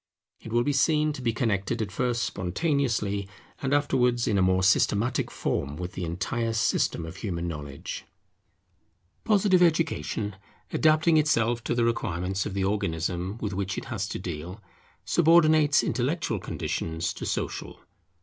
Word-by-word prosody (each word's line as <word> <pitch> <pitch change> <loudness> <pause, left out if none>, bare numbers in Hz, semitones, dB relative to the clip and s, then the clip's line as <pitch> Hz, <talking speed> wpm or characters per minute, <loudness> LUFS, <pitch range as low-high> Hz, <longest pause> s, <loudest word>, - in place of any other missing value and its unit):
It 115 - -10
will 120 +1 +3
be 145 - 0
seen 150 +2 +2
to 135 - -7
be 120 -2 +1
connected 110 -1 -1
at 105 -3 -2
first 120 +2 0
spontaneously, 105 - -1 0.3
and 135 - -1
afterwards 125 -4 +2
in 105 - +2
a 95 - +3
more 95 0 +3
systematic 105 +5 +2
form, 70 +1 -2
with 90 +1 -5
the 90 - -4
entire 115 +7 -2
system 105 -6 +1
of 80 +3 -9
human 85 -5 -3
knowledge. 75 -4 -6 1.2
Positive 200 -4 +4
Education, 155 - +1 0.4
adapting 155 +1 +4
itself 120 -6 +2
to 120 - 0
the 120 -1 +2
requirements 95 -4 -1
of 100 - -6
the 100 - 0
Organism 90 0 -1
with 105 -2 -2
which 95 0 -2
it - - -4
has 100 -3 -2
to - - -4
deal, 90 +2 -6 0.5
subordinates 155 -3 +5
intellectual 135 +8 -1
conditions 80 +1 -3
to - - -8
social. - - -3
110 Hz, 150 wpm, -27 LUFS, 95-140 Hz, 1.2 s, subordinates